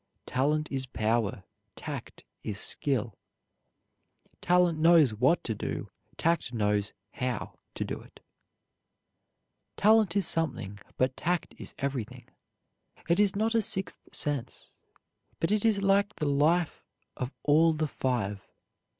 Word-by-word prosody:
Talent 150 +4 0
is 135 -1 -2
power, 110 -4 0 0.3
tact - - -7 0.2
is 100 -2 -3
skill. 120 -7 -1 1.2
Talent 175 -2 +3
knows 160 -6 +6
what 130 +10 +2
to 115 - -2
do, - - -5 0.3
tact 165 -6 +1
knows 105 -2 +1 0.2
how 125 -3 -4 0.2
to - - -2
do - - -5
it. - - -17 1.6
"Talent 215 -3 +4
is 200 -3 +3
something, 125 -13 0 0.2
but 130 0 +1
tact 175 +1 -1
is - - -10
everything. 135 -6 -4 0.8
It 170 +3 +2
is 205 -2 +4
not 220 +3 +1
a 230 - +3
sixth 190 -2 -2
sense, 145 -5 -3 0.7
but 165 - 0
it 210 -1 +2
is 215 -3 +2
like 200 +1 +3
the 150 - -2
life 155 +4 +1 0.3
of 125 +2 -5
all 160 +3 +5
the 155 0 -1
five. 110 -8 -2
150 Hz, 125 wpm, -29 LUFS, 125-175 Hz, 1.6 s, knows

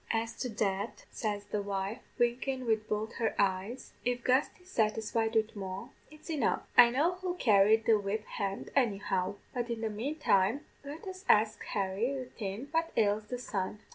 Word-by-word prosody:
"'As 225 0 -1
to 250 - -2
that,' 200 -1 -2
says 205 -2 -2
the 205 0 -2
wife, 200 +4 -3 0.2
winkin' 255 +2 0
wid 220 -2 +1
both 215 +1 -2
her 225 - 0
eyes, 200 +5 -1
'if 245 0 -1
Gusty's 295 +8 +1
satisfied 225 - +1
wid 220 0 +2
Moll, 195 +3 -5 0.2
it's 305 0 -15
enough. 300 -9 +1
I 235 - +9
know 290 +8 +2
who'll 365 -1 -3
carry 215 - +5
the 225 -1 +3
whip 205 +2 -2
hand, 195 0 -4
anyhow; 200 -6 +1 0.2
but 240 -2 -2
in 230 -1 -3
the 220 -1 -1
manetime 225 -1 +1 0.2
let 290 +5 -8
us 375 0 -7
ax 215 +1 +4
Harry 195 +2 0
'ithin 250 -3 -5
what 330 0 +1
ails 210 -1 +2
the 250 - -3
sun.' 205 -5 -3
225 Hz, 170 wpm, -31 LUFS, 205-250 Hz, 0.2 s, I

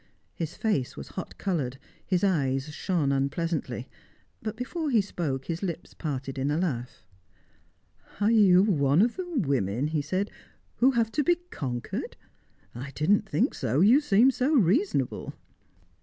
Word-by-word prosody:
His 165 0 -5
face 175 - -1
was - - -8
hot 185 - -7
coloured, 145 -10 -2 0.3
his 185 0 0
eyes 140 -6 +1
shone 160 -5 0
unpleasantly; 140 -2 -2 0.5
but 220 0 -4
before 300 +6 -3
he 235 -5 +4
spoke, 155 -9 -2
his 165 0 -4
lips 175 -3 -5
parted 135 -3 -4
in 135 +2 0
a 150 - +1
laugh. 130 -9 -3 1.1
"Are 210 +2 +3
you 195 -5 +6
one 150 -4 +3
of 235 - +1
the 365 -1 -5
women," 140 - 0
he 155 -2 0
said, 185 +8 -2 0.5
"who 255 - +5
have 230 -2 +1
to 295 - +1
be 350 +4 +4 0.2
conquered? 120 -4 -4 0.6
I 130 +4 -6
didn't 200 +7 +2
think 245 +8 +1
so. 130 +4 0
You 235 +10 +6
seemed 250 0 +4
so 275 +6 +1
reasonable." 255 - +1
175 Hz, 150 wpm, -27 LUFS, 140-220 Hz, 1.1 s, you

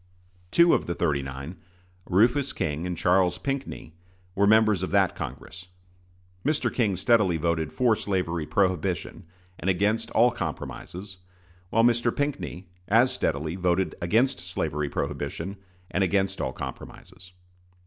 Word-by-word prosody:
Two 170 - +5
of - - +1
the 85 - -2
"thirty 75 -6 +1
nine" 70 +6 -7 0.5
Rufus 120 +9 +3
King 80 +3 -2
and 90 -2 -3
Charles 90 0 +3
Pinckney 135 - -4 0.4
were 100 +2 +2
members 110 -3 +4
of 95 - -2
that 95 -2 +3
Congress. 90 -1 -8 0.8
Mr. 150 +2 0
King 105 -6 +1
steadily 95 -3 +3
voted 80 -1 -1
for 120 +1 +3
slavery 90 -7 -2
prohibition 95 -2 -1 0.3
and 95 - -1
against 100 +4 +1
all 120 +2 +4
compromises, 95 -4 -6 0.5
while 115 +3 +3
Mr. 120 0 +3
Pinckney 95 - -3 0.2
as 115 +6 +4
steadily 80 +3 -1
voted 90 0 +1
against 115 +9 +2
slavery 75 -4 -3
prohibition 95 +7 -4 0.3
and 95 - +1
against 95 0 0
all - - -1
compromises. 90 0 -9
95 Hz, 130 wpm, -26 LUFS, 85-110 Hz, 0.8 s, Two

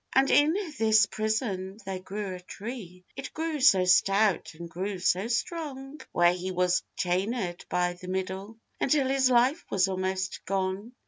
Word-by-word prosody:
And 270 +1 +4
in 295 +2 +5 0.3
this 220 -1 +5
prison 210 -3 -2
there 190 -1 -4
grew 195 +1 -5
a 180 - -7
tree, 185 -2 -8
It 270 - -7
grew 320 -1 -2
so 195 -9 +5
stout, 195 0 +3
and 170 +1 -8
grew 190 +4 -4
so 185 +3 +1
strong; 275 +2 -4
Where 175 0 +4
he 180 +1 -4
was 180 0 +1 0.2
chainèd 185 0 -2
by 180 0 +1
the 180 +1 -12
middle, 190 +3 -4 0.2
Until 275 -1 +2
his 265 -1 +3
life 255 +6 +3
was 190 -1 +2
almost 190 0 -2
gone. 195 +4 -2
195 Hz, 155 wpm, -28 LUFS, 185-245 Hz, 0.3 s, in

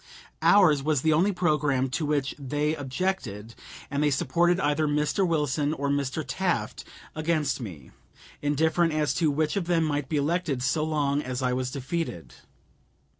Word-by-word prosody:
Ours 170 -9 +5
was 150 -2 0
the 160 -1 +4
only 180 +7 +3
programme 150 -7 +1
to 150 +2 -1
which 145 -2 0
they 145 +3 -1
objected, 130 - -3 0.4
and 140 +1 -1
they 150 - +3
supported 170 +6 +2
either 150 -1 +1
Mr. 150 +6 +1
Wilson 150 -2 0
or 140 -1 -2
Mr. 140 -2 -1
Taft - - -2 0.3
against 155 -3 -1
me, 85 - -9 0.5
indifferent 160 +3 +1
as 150 -1 +1
to 165 -3 +1
which 150 +3 0
of 195 -4 -1
them 170 -2 +2
might 145 -3 -1
be 155 - 0
elected 145 -3 0
so 155 +4 +1
long 145 -2 0
as 130 -1 -4
I 125 0 +1
was 130 0 -1
defeated. 130 - -4
150 Hz, 160 wpm, -26 LUFS, 135-160 Hz, 0.5 s, Ours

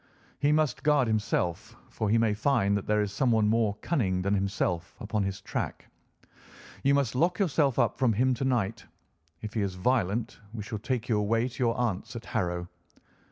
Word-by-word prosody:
"He 145 +1 +3
must 155 -2 +1
guard 145 -4 +3
himself, 105 -6 -1 0.2
for 110 - -2
he 115 - +4
may 115 -2 +2
find 110 -3 +2
that 100 - -3
there 105 0 +2
is 100 - -3
someone 110 0 +2
more 110 -2 +2
cunning 95 - 0
than 100 +1 +1
himself 95 -3 -1
upon 110 0 -2
his 95 -1 -3
track. - - -4 0.9
You 140 +1 +3
must 140 -5 +1
lock 170 +8 +2
yourself 150 - +2
up - - +1
from 130 -3 +3
him 130 +5 +2
to 125 - -3
night. 115 -5 0 0.6
If 110 - -5
he 110 - 0
is 95 -2 -2
violent, 110 +1 0 0.2
we 105 - -4
shall 110 0 -5
take 120 +1 -2
you 110 -3 +2
away 115 +3 +1
to 125 0 -3
your 115 - +1
aunt's 115 0 -2
at 115 - -7
Harrow. 90 -4 -2
110 Hz, 190 wpm, -28 LUFS, 100-130 Hz, 0.9 s, he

